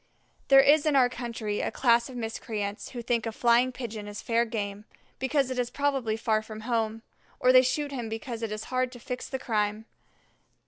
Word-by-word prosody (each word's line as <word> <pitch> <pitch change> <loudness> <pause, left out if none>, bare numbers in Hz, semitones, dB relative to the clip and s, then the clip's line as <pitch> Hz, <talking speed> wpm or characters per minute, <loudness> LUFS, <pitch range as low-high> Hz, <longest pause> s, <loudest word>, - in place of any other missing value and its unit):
There 270 -1 +8
is 290 +2 +4
in 300 - +3
our 255 -2 +5
country 230 -4 -4
a - - -1
class 235 -1 +3
of 255 - -9
miscreants 220 -3 -4
who 240 -2 -7
think 235 -1 0
a - - -2
flying 240 +3 +3
Pigeon 225 -4 -6
is 205 0 -7
fair 235 0 +1
game, 205 -2 -4 0.3
because 265 0 +1
it 255 - -2
is 245 -1 0
probably 270 -5 0
far 220 -1 +1
from 215 0 -9
home, 225 -1 -1 0.4
or 255 - +5
they 255 - +9
shoot 285 +3 -1
him 240 -5 -4
because 225 +1 -5
it 225 -2 -3
is 215 0 -4
hard 255 0 +1
to 245 - -10
fix 250 +1 -6
the 265 - -2
crime. 215 -3 -1
235 Hz, 200 wpm, -28 LUFS, 220-255 Hz, 0.4 s, they